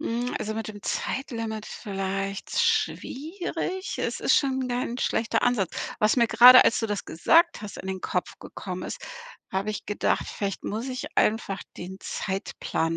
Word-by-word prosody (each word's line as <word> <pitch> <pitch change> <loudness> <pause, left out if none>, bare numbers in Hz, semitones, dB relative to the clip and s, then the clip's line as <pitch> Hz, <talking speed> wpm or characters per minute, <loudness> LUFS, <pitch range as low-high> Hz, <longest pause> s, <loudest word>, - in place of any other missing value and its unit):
Hm, 240 +2 -2
also 215 +1 -3
mit 225 0 -4
dem 205 -1 -9
Zeitlimit 225 -5 -3
vielleicht 195 -1 -3
schwierig. 355 +5 -1
Es - - -2
ist - - +4
schon 265 -2 +1
kein 245 0 -2
schlechter 230 -1 0
Ansatz. 235 -7 +2 0.3
Was 215 +2 +4
mir 235 -2 +5
grade, 245 +3 +9
als - - +3
du 225 - 0
das 205 -2 -3
gesagt 335 - +3
hast, 205 -2 -7
in - - -8
den 190 -1 -3
Kopf - - -2
gekommen - - -7
ist - - -5 0.5
hab 190 +1 -1
ich 215 -1 -3
gedacht, 205 - 0
vielleicht 200 -2 -4
muss 225 +5 -3
ich 255 -1 -4
einfach 210 -3 +1 0.2
den 190 +2 -7
Zeitplan 180 -4 -2
220 Hz, 160 wpm, -26 LUFS, 195-250 Hz, 0.5 s, grade